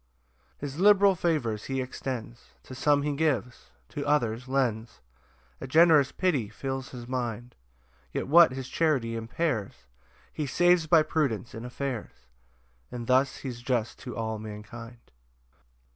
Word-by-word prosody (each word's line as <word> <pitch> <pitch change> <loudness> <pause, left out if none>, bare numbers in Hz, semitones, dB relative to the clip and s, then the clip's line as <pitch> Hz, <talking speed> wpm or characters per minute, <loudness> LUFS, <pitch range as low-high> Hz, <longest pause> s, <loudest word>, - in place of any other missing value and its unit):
2 - - -3
His 145 +2 -6
liberal 200 0 +6
favours 150 - -1
he 135 0 -2
extends, 125 -2 -6
To - - -11
some 145 +2 +2
he 145 0 -1
gives, 135 -6 -1 0.2
to 145 - -5
others 125 -4 0
lends; 120 -4 -1 0.6
A 135 - -5
generous 155 -2 +5
pity 145 - 0
fills 135 +3 -5
his 120 -2 -9
mind: 120 -1 -4 0.6
Yet - - -3
what 165 +1 +7
his 130 0 -6
charity 130 -8 0
impairs 115 -1 -3 0.5
He 150 - -3
saves 175 +3 +3
by 160 -1 +6
prudence 135 -8 -1
in 115 +1 -7
affairs, 125 - -5 0.7
And 120 -1 -5
thus 130 +2 +2
he's 125 -3 -7
just 120 -2 -1
to 125 -4 -8
all 110 -1 -3
mankind. 110 +3 -10
130 Hz, 140 wpm, -28 LUFS, 115-150 Hz, 0.7 s, what